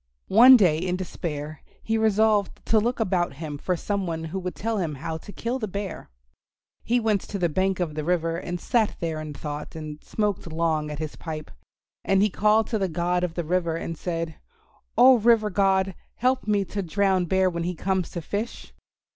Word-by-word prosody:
One 250 +5 +10
day 170 -8 +3
in 180 +1 -1
despair 155 -5 -5 0.2
he 225 - 0
resolved 215 -2 +2
to 220 - +4
look 240 +4 -1
about 180 -6 0
him 145 0 -6
for 180 +2 -1
some 200 +1 -2
one 165 -1 -3
who 165 +4 -4
would 180 -2 -5
tell 225 0 -2
him 160 -5 -2
how 160 +4 -4
to 205 - -11
kill 240 +5 -3
the 215 - -2
Bear. 200 -2 -5 0.7
He 245 +1 +2
went 215 -4 +1
to 205 - -3
the 175 -3 +1
bank 190 +4 0
of 170 -4 -1
the 155 0 -3
river 165 0 0
and 175 0 -4
sat 220 +3 +1
there 160 -2 -3
in 150 -1 -7
thought 150 +1 -6
and 155 -1 -7
smoked 205 -5 -2
long 160 -2 0
at 150 - -5
his 155 -1 -5
pipe. 155 -2 -6 0.5
And 195 0 +3
he 210 - +2
called 215 +3 +3
to 220 - 0
the 190 -2 0
God 175 +2 0
of 170 -2 -2
the 175 - -1
River 170 0 0
and 165 0 -4
said, 165 -1 -4 0.6
"Oh, 255 -1 +8
River 220 -1 +4
God, 190 0 +2 0.2
help 255 0 0
me 205 -2 +2
to 200 +3 -4
drown 190 0 +1
Bear 190 +2 +2
when 170 -2 -2
he 175 +1 -2
comes 190 +1 -1
to 170 - -6
fish." 210 +8 -5
180 Hz, 205 wpm, -25 LUFS, 165-210 Hz, 0.7 s, One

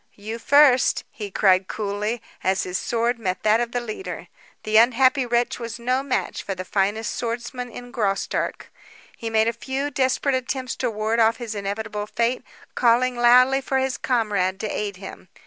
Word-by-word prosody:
"You 220 +3 -6
first!" 275 +1 +4
he 210 -7 -7
cried 190 -1 +3
coolly, 210 +2 -3 0.2
as 190 0 +1
his 180 0 -3
sword 235 +1 -1
met 185 -4 -3
that 215 +1 +4
of 240 -1 -2
the 245 - -1
leader. 240 - -7 0.3
The 215 0 +2
unhappy 255 +3 +4
wretch 240 +1 0
was 230 -1 -5
no 250 +2 0
match 275 -2 -2
for 195 - -4
the 185 0 -6
finest 205 +3 0
swordsman 240 +1 -4
in 245 +1 -10
Graustark. 200 -5 -2 0.4
He 230 - -5
made 220 0 +2
a 230 - +1
few 265 +5 -3
desperate 265 +1 +1
attempts 255 0 -2
to 250 - -1
ward 220 +1 -1
off 225 0 +4
his 235 -3 -5
inevitable 210 +1 -4
fate, 235 +4 -1 0.3
calling 250 +1 +3
loudly 250 +3 +5
for 265 0 -1
his 265 -2 0
comrade 205 -6 0
to 215 - -3
aid 205 -2 -3
him. 190 -1 -10
230 Hz, 175 wpm, -23 LUFS, 210-250 Hz, 0.4 s, loudly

